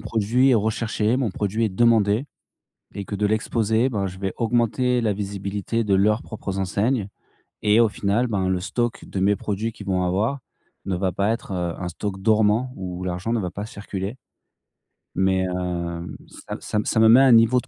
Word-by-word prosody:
produit 115 Hz, +5 st, +2 dB
est -, -, +5 dB
recherché, 110 Hz, +1 st, 0 dB
mon 130 Hz, -5 st, 0 dB
produit 105 Hz, +4 st, -1 dB
est -, -, +2 dB
demandé, 110 Hz, +3 st, +3 dB, 0.7 s
et 100 Hz, -, -5 dB
que 100 Hz, -, -6 dB
de 105 Hz, +1 st, +1 dB
l'exposer, 110 Hz, +2 st, +1 dB
ben 105 Hz, -6 st, -2 dB
je 95 Hz, 0 st, -7 dB
vais 95 Hz, -1 st, -2 dB
augmenter 120 Hz, +2 st, +1 dB
la 110 Hz, -3 st, +1 dB
visibilité 100 Hz, +2 st, -3 dB
de 100 Hz, -2 st, +2 dB
leurs 105 Hz, +4 st, +3 dB
propres 100 Hz, -3 st, -5 dB
enseignes. 100 Hz, +4 st, 0 dB, 0.5 s
Et 105 Hz, +1 st, +4 dB
au 115 Hz, -2 st, +5 dB
final, 105 Hz, +4 st, 0 dB
ben 100 Hz, -5 st, -1 dB
le 95 Hz, -1 st, +1 dB
stock 120 Hz, +5 st, -2 dB
de 95 Hz, -, -4 dB
mes 100 Hz, +2 st, +3 dB
produits 105 Hz, +3 st, -3 dB
qu'ils 105 Hz, -2 st, -11 dB
vont 90 Hz, -1 st, +1 dB
avoir 100 Hz, +10 st, 0 dB, 0.5 s
ne 95 Hz, -2 st, -1 dB
va 95 Hz, +1 st, 0 dB
pas 100 Hz, +4 st, 0 dB
être, 115 Hz, -3 st, -4 dB
heu, 90 Hz, -2 st, -2 dB
un 90 Hz, -, -3 dB
stock 95 Hz, +3 st, -5 dB
dormant 110 Hz, +4 st, +2 dB
où 90 Hz, -3 st, -6 dB
l'argent 90 Hz, +5 st, -2 dB
ne 120 Hz, -, +1 dB
va 90 Hz, -4 st, -3 dB
pas 100 Hz, +3 st, -5 dB
circuler. 100 Hz, -1 st, -6 dB, 1.0 s
Mais, 95 Hz, 0 st, +2 dB
hem, 90 Hz, -2 st, -3 dB, 0.2 s
ça -, -, -8 dB
m -, -, -9 dB
ça -, -, -3 dB
m 105 Hz, -, 0 dB
ça -, -, +1 dB
me 110 Hz, -, +6 dB
met 120 Hz, +3 st, +8 dB
un 135 Hz, -1 st, +6 dB
niveau 115 Hz, +2 st, +5 dB
de 130 Hz, -, -20 dB
105 Hz, 200 wpm, -23 LUFS, 95-115 Hz, 1.0 s, met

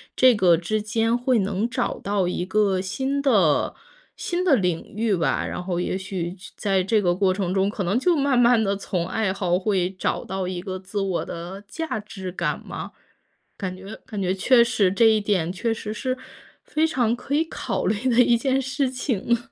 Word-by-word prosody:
这 255 Hz, -1 st, +6 dB
个 180 Hz, -4 st, +5 dB
之 210 Hz, +6 st, -1 dB
间 225 Hz, +2 st, +1 dB
会 245 Hz, -1 st, +2 dB
能 200 Hz, +3 st, -1 dB
找 -, -, -2 dB
到 200 Hz, -1 st, 0 dB
一 180 Hz, 0 st, -2 dB
个 195 Hz, -1 st, +2 dB
新 265 Hz, +9 st, -2 dB
的 200 Hz, -, +3 dB, 0.4 s
新 360 Hz, +1 st, -2 dB
的 295 Hz, -7 st, +5 dB
领 180 Hz, -5 st, -2 dB
域 220 Hz, -1 st, +1 dB
吧。 165 Hz, -, 0 dB
然 -, -, -4 dB
后 180 Hz, -1 st, -3 dB
也 185 Hz, -, -1 dB
许 185 Hz, -2 st, -4 dB
去 185 Hz, -, -13 dB
在 195 Hz, -3 st, +1 dB
这 215 Hz, +2 st, +2 dB
个 175 Hz, -3 st, +2 dB
过 185 Hz, 0 st, +2 dB
程 185 Hz, -2 st, -2 dB
中， 195 Hz, +1 st, +2 dB
可 205 Hz, -2 st, -3 dB
能 200 Hz, +8 st, +1 dB
就 350 Hz, +4 st, +3 dB
慢 275 Hz, -4 st, +2 dB
慢 240 Hz, -2 st, +5 dB
地 200 Hz, -1 st, 0 dB
从 180 Hz, -3 st, -2 dB
爱 195 Hz, -1 st, 0 dB
好 180 Hz, -2 st, 0 dB
会 190 Hz, -3 st, +1 dB
找 185 Hz, -1 st, -2 dB
到 190 Hz, -1 st, -3 dB
一 180 Hz, -1 st, -4 dB
个 185 Hz, -1 st, -5 dB
自 200 Hz, +2 st, -4 dB
我 190 Hz, -3 st, -1 dB
的 175 Hz, +4 st, -7 dB
价 320 Hz, -2 st, -4 dB
值 190 Hz, -3 st, -7 dB
感 -, -, -2 dB
嘛， -, -, -6 dB, 0.7 s
感 185 Hz, -2 st, -4 dB
觉 195 Hz, +3 st, -9 dB
感 210 Hz, -5 st, -5 dB
觉 185 Hz, 0 st, +1 dB
确 235 Hz, +5 st, +5 dB
实 225 Hz, -5 st, +2 dB
这 225 Hz, +4 st, +3 dB
一 220 Hz, -1 st, +5 dB
点 190 Hz, -5 st, 0 dB
确 225 Hz, +5 st, -1 dB
实 215 Hz, -1 st, -6 dB
是 255 Hz, +4 st, -2 dB, 0.5 s
非 315 Hz, +1 st, +1 dB
常 240 Hz, -7 st, +1 dB
可 250 Hz, +3 st, -6 dB
以 320 Hz, -, +3 dB
考 325 Hz, -, -3 dB
虑 220 Hz, +5 st, 0 dB
的 245 Hz, +1 st, +5 dB
一 235 Hz, -1 st, +4 dB
件 265 Hz, +2 st, +1 dB
事 270 Hz, +1 st, -1 dB
情。 240 Hz, -3 st, 0 dB
205 Hz, 220 characters per minute, -24 LUFS, 185-240 Hz, 0.7 s, 这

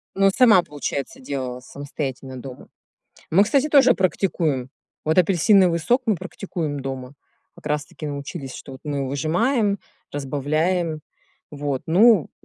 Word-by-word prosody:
Ну, 195 Hz, 0 st, +4 dB
сама, 230 Hz, -8 st, +6 dB
получается, 145 Hz, -, -5 dB
делала, 130 Hz, -, -4 dB
самостоятельно 135 Hz, -1 st, -6 dB
дома. 125 Hz, 0 st, -10 dB, 0.6 s
Мы, 190 Hz, +5 st, +6 dB
кстати, 275 Hz, +6 st, +2 dB
тоже 280 Hz, -2 st, +6 dB
практикуем. 165 Hz, -, 0 dB, 0.4 s
Вот 155 Hz, +2 st, +1 dB
апельсиновый 185 Hz, 0 st, +4 dB
сок 240 Hz, +11 st, +2 dB
мы 220 Hz, -3 st, +2 dB
практикуем 165 Hz, -5 st, -5 dB
дома. 135 Hz, -1 st, -6 dB, 0.4 s
Как -, -, -17 dB
раз 150 Hz, -1 st, -1 dB
таки 155 Hz, -, -9 dB
научились, 140 Hz, -1 st, -6 dB
что 135 Hz, -, -9 dB
вот 130 Hz, -, -12 dB
мы 140 Hz, -2 st, -2 dB
выжимаем, 200 Hz, -, +1 dB, 0.3 s
разбавляем. 155 Hz, +4 st, -1 dB, 0.5 s
Вот, 145 Hz, -2 st, -3 dB
ну, 200 Hz, +1 st, +5 dB
155 Hz, 130 wpm, -22 LUFS, 140-195 Hz, 0.6 s, сама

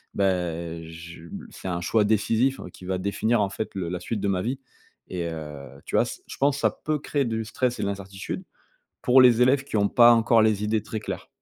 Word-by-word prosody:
bah, 85 Hz, -4 st, -1 dB
je 85 Hz, +1 st, -10 dB
b -, -, -8 dB
c'est -, -, -8 dB
un 85 Hz, -1 st, -2 dB
choix 105 Hz, +4 st, +2 dB
décisif 115 Hz, +5 st, +2 dB
qui 90 Hz, -, -12 dB
va 95 Hz, 0 st, -1 dB
définir, 105 Hz, +4 st, 0 dB
en 100 Hz, -, +1 dB
fait, 110 Hz, -, -5 dB
le 90 Hz, -3 st, -3 dB
la 90 Hz, 0 st, -3 dB
suite 105 Hz, +3 st, -4 dB
de 100 Hz, -, 0 dB
ma 95 Hz, -2 st, +1 dB
vie» 130 Hz, +5 st, -2 dB, 0.5 s
et 85 Hz, -2 st, -3 dB
heu, 75 Hz, -4 st, -8 dB
tu -, -, -4 dB
vois? -, -, +4 dB
Ç -, -, -7 dB
je -, -, -9 dB
pense 140 Hz, 0 st, +2 dB
ça -, -, +2 dB
peut 155 Hz, 0 st, -2 dB
créer 145 Hz, -1 st, -1 dB
du 110 Hz, -1 st, -2 dB
stress 125 Hz, +2 st, -1 dB
et -, -, -1 dB
de -, -, 0 dB
l'incertitude 95 Hz, -1 st, -5 dB, 0.6 s
pour 130 Hz, +1 st, +6 dB
les 125 Hz, -1 st, +6 dB
élèves 135 Hz, +2 st, +4 dB
qui 140 Hz, -, -6 dB
ont 100 Hz, -1 st, +3 dB
pas 120 Hz, 0 st, +7 dB
encore 115 Hz, 0 st, +4 dB
les 105 Hz, -1 st, +2 dB
idées 110 Hz, 0 st, +1 dB
très 110 Hz, 0 st, -5 dB
claires. -, -, -6 dB
105 Hz, 230 wpm, -25 LUFS, 90-120 Hz, 0.6 s, pas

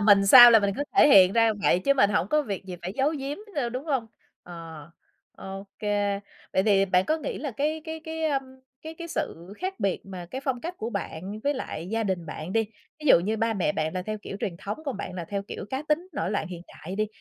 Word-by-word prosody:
mình 205 Hz, -1 st, +5 dB
sao 240 Hz, +2 st, +11 dB
là 225 Hz, -, +8 dB
mình 200 Hz, -2 st, 0 dB
cứ 285 Hz, -, -1 dB
thể 300 Hz, -, +7 dB
hiện 190 Hz, -7 st, +7 dB
ra 230 Hz, -1 st, +4 dB
vậy 175 Hz, -, +4 dB
chứ 275 Hz, +9 st, +2 dB
mình 210 Hz, -7 st, +4 dB
hổng 205 Hz, -2 st, +1 dB
có 305 Hz, 0 st, +2 dB
việc 200 Hz, -6 st, -5 dB
gì 180 Hz, -2 st, -7 dB
phải 185 Hz, +2 st, -4 dB
giấu 275 Hz, +3 st, +2 dB
giếm 275 Hz, +2 st, -4 dB, 0.2 s
đâu, 260 Hz, -5 st, 0 dB
đúng 255 Hz, +4 st, -5 dB
hông? 265 Hz, -7 st, -1 dB, 0.4 s
Ờ, 165 Hz, -2 st, -10 dB, 0.5 s
ô 195 Hz, +1 st, -8 dB
kê. 205 Hz, -1 st, 0 dB, 0.3 s
Vậy 190 Hz, -, +3 dB
thì 195 Hz, -2 st, +4 dB
bạn 185 Hz, -1 st, +2 dB
có 315 Hz, -, +1 dB
nghĩ 315 Hz, -, -5 dB
là 290 Hz, -, -4 dB
cái 300 Hz, +6 st, -1 dB
cái 320 Hz, 0 st, -6 dB
cái, 320 Hz, 0 st, -4 dB
a, 290 Hz, -3 st, +2 dB, 0.4 s
cái 320 Hz, +1 st, -7 dB
cái 335 Hz, +1 st, -8 dB
sự 175 Hz, -, -4 dB
khác 375 Hz, +1 st, -4 dB
biệt 195 Hz, -2 st, 0 dB
mà 180 Hz, -3 st, -8 dB
cái 265 Hz, -, -4 dB
phong 255 Hz, -3 st, -1 dB
cách 345 Hz, +2 st, -5 dB
của 225 Hz, +2 st, -4 dB
bạn 200 Hz, +1 st, -5 dB
với 285 Hz, +1 st, +2 dB
lại 175 Hz, -9 st, -5 dB
gia 225 Hz, 0 st, 0 dB
đình 180 Hz, -4 st, -2 dB
bạn 155 Hz, +3 st, -6 dB
đi, 225 Hz, +1 st, +3 dB, 0.4 s
ví 300 Hz, -, -6 dB
dụ 170 Hz, -, +7 dB
như 215 Hz, +5 st, -1 dB
ba 225 Hz, 0 st, 0 dB
mẹ 175 Hz, -6 st, 0 dB
bạn 155 Hz, +1 st, -2 dB
là 185 Hz, -, -2 dB
theo 215 Hz, +2 st, -4 dB
kiểu 195 Hz, -, -6 dB
truyền 175 Hz, -4 st, -3 dB
thống, 200 Hz, +3 st, -5 dB
còn 275 Hz, -7 st, -3 dB
bạn 185 Hz, -, -6 dB
là 175 Hz, -2 st, -5 dB
theo 200 Hz, -1 st, -2 dB
kiểu 200 Hz, -, -7 dB
cá 265 Hz, +2 st, -2 dB
tính, 325 Hz, +4 st, 0 dB
nổi 190 Hz, -, -2 dB
loạn 205 Hz, -, -1 dB
hiện 175 Hz, -1 st, -8 dB
đại 185 Hz, +4 st, -9 dB
đi, 215 Hz, 0 st, +1 dB
210 Hz, 260 wpm, -26 LUFS, 185-275 Hz, 0.5 s, sao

